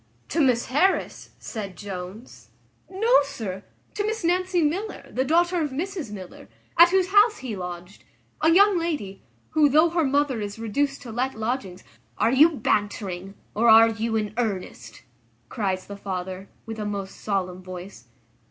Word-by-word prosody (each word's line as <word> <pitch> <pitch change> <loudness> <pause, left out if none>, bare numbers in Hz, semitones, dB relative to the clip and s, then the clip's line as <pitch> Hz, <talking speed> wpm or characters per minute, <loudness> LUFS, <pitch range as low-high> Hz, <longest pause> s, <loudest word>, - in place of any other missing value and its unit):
"To 325 - +1
Miss 250 -4 +3
Harris!" 330 +9 0
said 200 -5 -7
Jones; 195 +4 -9 0.4
"no, 440 +6 0
sir; 225 -10 -5 0.3
to 410 - -2
Miss 440 -1 -2
Nancy 360 0 +1
Miller, 370 +9 -2
the 260 - 0
daughter 345 +4 +2
of 300 - -1
Mrs 320 - -4
Miller, 190 -3 -10 0.3
at 340 +1 +8
whose 375 0 +2
house 420 +3 +5
he 255 -5 -5
lodged; 180 0 -8 0.4
a 320 - +4
young 390 +2 +5
lady, 290 - -3 0.3
who, 305 -2 +4
though 315 +4 +4
her 335 -1 +1
mother 280 -4 +1
is 205 0 -5
reduced 275 +6 -2
to 240 - -8
let 255 +4 -2
lodgings 220 -5 -3 0.2
" - - -38
"Are 230 - +2
you 290 +6 +7
bantering, 205 - -2 0.2
or 230 +3 +3
are 225 +1 +8
you 225 0 -2
in 210 -1 -1
earnest?" 185 - -4 0.5
cries 190 -3 -2
the 200 - -8
father, 190 0 -5 0.2
with 225 0 -7
a 210 - -3
most 200 -2 -5
solemn 185 -3 -2
voice. 185 - -9
230 Hz, 160 wpm, -24 LUFS, 195-320 Hz, 0.5 s, at